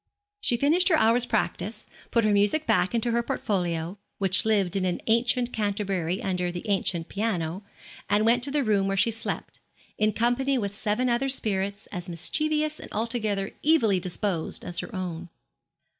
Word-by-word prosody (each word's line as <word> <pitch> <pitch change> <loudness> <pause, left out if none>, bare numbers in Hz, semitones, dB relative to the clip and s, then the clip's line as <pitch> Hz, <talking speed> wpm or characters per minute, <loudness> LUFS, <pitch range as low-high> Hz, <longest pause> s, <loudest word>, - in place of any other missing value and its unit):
She 240 - +2
finished 320 +9 +3
her 335 - +5
hour's 235 -1 +4
practice, 215 0 -2 0.2
put 230 -2 +2
her 215 - +3
music 205 +10 +2
back 180 +5 +2
into 235 +1 0
her 235 +1 +2
portfolio, 180 -5 -2 0.2
which 190 0 +3
lived 200 -5 +2
in 195 - 0
an 180 -1 -1
ancient 240 +2 +2
canterbury 195 -2 -1
under 180 -2 -1
the 175 +4 -7
ancient 190 -4 +1
piano, 190 -4 -2 0.5
and 205 +2 +3
went 240 +2 +4
to - - -4
the 285 0 +1
room 205 -4 +1
where 195 0 -1
she 230 - +3
slept, 225 - -5 0.4
in 215 0 +3
company 250 +5 +1
with 200 -4 -2
seven 215 +4 0
other 245 +3 +1
spirits, 200 -5 -1
as 180 -2 -6
mischievous 305 - 0
and - - -11
altogether 215 -3 -2
evilly 235 - +3
disposed 180 -1 -3
as 175 - -3
her - - -5
own. 175 -2 -5
210 Hz, 170 wpm, -26 LUFS, 185-235 Hz, 0.5 s, her